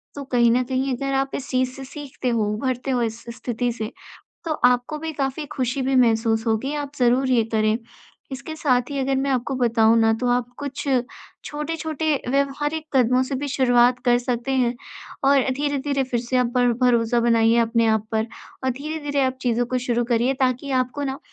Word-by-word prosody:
तो 285 - -5
कहीं 240 -3 +3
न 250 +2 +2
कहीं 260 +1 -1
अगर 275 +2 -3
आप 270 0 0
इस 275 - -6
चीज़ 255 0 +1
से 270 - -8
सीखते 270 -1 -5
हो, 230 -2 +1
उभरते 255 +3 -2
हो 245 - +1
इस 225 0 -3
स्थिति 245 0 -2
से 225 0 -5 0.5
तो 325 - -1
आपको 250 +4 +3
भी 320 +1 -4
काफ़ी 275 +1 -2
खुशी 265 -1 -2
भी 265 +1 0
महसूस 225 -2 +2
होगी 230 +6 0
आप 290 -1 -4
ज़रूर 255 +2 +3
ये 235 -3 +3
करें। 215 0 +2 0.6
इसके 270 +4 -6
साथ 255 -5 +2
ही 280 - -3
अगर 270 0 0
मैं 275 +1 0
आपको 260 +1 -1
बताऊँ 230 -2 +3
ना 225 0 +4
तो 250 - 0
आप 245 -1 +1
कुछ 285 0 -5 0.6
छोटे-छोटे 310 0 -2 0.2
व्यावहारिक 295 +3 -1
कदमों 255 0 +4
से 265 +1 -3
भी 285 +1 -3
शुरुआत 245 -1 +3
कर 245 0 +4
सकते 245 +1 -2
हैं 250 -2 +1 0.5
और 275 0 +5 0.2
धीरे-धीरे 285 -1 -1
फिर 245 -2 -2
से 250 +2 -2
आप 245 -1 +1
पर 245 -1 +3
भरोसा 240 -1 +3
बनाइए 230 0 +3
अपने 230 0 +2
आप 220 -1 +1
पर 220 0 +1 0.4
अ, 260 - +2
धीरे-धीरे 285 +1 -2
आप 260 0 0
चीज़ों 240 -1 +1
को 255 +1 -1
शुरू 240 -1 0
करिए 240 +2 +1
ताकि 260 +2 0
आपको 255 +3 -3
ना 270 0 -3
255 Hz, 195 wpm, -23 LUFS, 240-275 Hz, 0.6 s, और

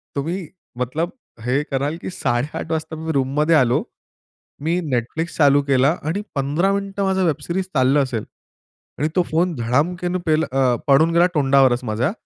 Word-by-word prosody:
तुम्ही, 165 +5 -3 0.3
मतलब 150 +8 -2 0.3
हे 130 +3 +1
कराल 140 +4 -1
की - - -5
8:30 135 -2 -2
वाजता 160 0 -3
मी 160 +1 -4
रूममध्ये 150 +3 +2
आलो, 125 -4 +3 0.8
मी 165 +4 0
Netflix 140 +8 -2
चालू 145 -2 +5
केला, 135 +3 +3
आणि 165 +7 -2
15 145 +8 +1
मिनिटं 200 0 -2
माझं 190 -1 +1
वेब 155 -3 0
सीरीज 180 +5 -2
चाललं 135 +1 +3
असेल. 120 -5 -4 0.7
आणि 150 - +1
तो 185 - +4
फोन 170 +3 +1
धडामकेने 170 +10 0
पेल 155 -1 +2
अ, 130 -2 +2
पडून 155 +4 +5
गेला 170 +1 +5
तोंडावरचं 135 -3 +3
माझ्या. 115 +8 0
150 Hz, 155 wpm, -21 LUFS, 135-170 Hz, 0.8 s, चालू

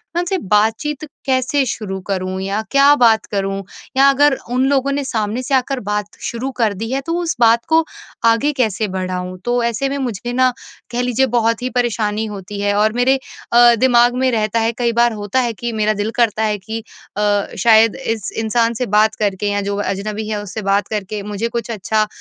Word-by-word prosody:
मैं 345 - +2
उनसे 355 +2 -1
बातचीत 225 +8 +1 0.2
कैसे 265 +2 +1
शुरू 205 -5 -4
करूँ 185 -1 -3
या 195 +3 -2
क्या 280 +1 +6
बात 230 -5 +4
करूँ? 195 -1 -2 0.3
या 275 +1 +6
अगर 275 0 +3
उन 255 +1 +2
लोगों 280 0 +1
ने 280 0 -1
सामने 225 -2 -2
से 275 - -3
आकर 265 +1 0
बात 210 -1 -2 0.2
शुरू 235 +3 -3
कर 225 -4 +2
दी 225 +4 -5
है 270 +1 -1
तो 330 - -2
उस 335 -1 -2
बात 230 0 +4
को 325 0 +4 0.4
आगे 230 +6 +3
कैसे 220 -5 0
बढ़ाऊँ? 185 -1 -4
तो 240 0 +1
ऐसे 235 +4 -1
में 280 - -2
मुझे 240 -3 -4
ना 255 +1 +4 0.4
कह 245 0 -1
लीजिए 250 +1 +1
बहुत 230 0 +1
ही 250 - -2
परेशानी 225 -3 -1
होती 205 -1 -7
है 205 0 +1
और 215 +1 +2
मेरे 255 +3 +2 0.3
अ, 240 0 +7
दिमाग 245 -1 +4
में 260 - +3
रहता 220 -1 0
है 225 0 +1
कई 240 -1 +1
बार 235 0 +3
होता 205 +3 -1
है 240 -2 0
कि 240 +2 -4
मेरा 215 0 +1
दिल 210 +1 -2
करता 220 -2 +1
है 210 -1 0
कि 220 +3 -6 0.4
अ, 205 -1 +1
शायद 225 -1 +5
इस 225 -6 -3
इंसान 230 +1 +1
से 250 +2 -2
बात 215 +1 +3
करके 205 -1 -1
या 205 0 0
जो 200 0 -2
अजनबी 210 +2 -3
है 210 -1 -2
उससे 210 +2 -6
बात 200 0 +1
करके 210 -1 -4
मुझे 210 +2 -3
कुछ 235 0 -4
अच्छा 215 0 0
अ, - - -4
225 Hz, 210 wpm, -18 LUFS, 210-250 Hz, 0.4 s, अ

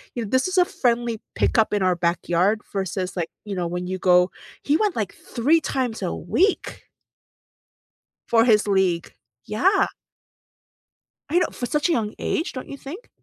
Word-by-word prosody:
you 235 - -2
know, 200 - -6
this 260 +6 +2
is 370 0 -3
a 360 - +6
friendly 235 -5 0
pickup 220 -2 +2
in 200 -2 +1
our 185 -1 +3
backyard 175 +4 +1
versus, 190 -1 -3
like, 170 -2 -2 0.2
you 200 -2 -4
know, 175 -2 -1
when 180 +1 -4
you 185 0 -3
go 180 0 +4 0.3
he 295 +2 +3
went, 420 -4 0
like, 210 -4 -2
3 295 +8 +1
times 245 -7 -2
a 180 - -2
week 375 - 0 1.5
for 230 0 +4
his 215 -3 +4
league. 190 -4 +1 0.3
Yeah. 385 - +2 1.4
I 340 - +2
know - - +2
for 245 - -4
such 300 +6 0
a - - +3
young 215 -7 0
age, 330 - -1
don't 255 - -7
you 280 - -7
think? 340 - -9
220 Hz, 170 wpm, -23 LUFS, 185-280 Hz, 1.5 s, a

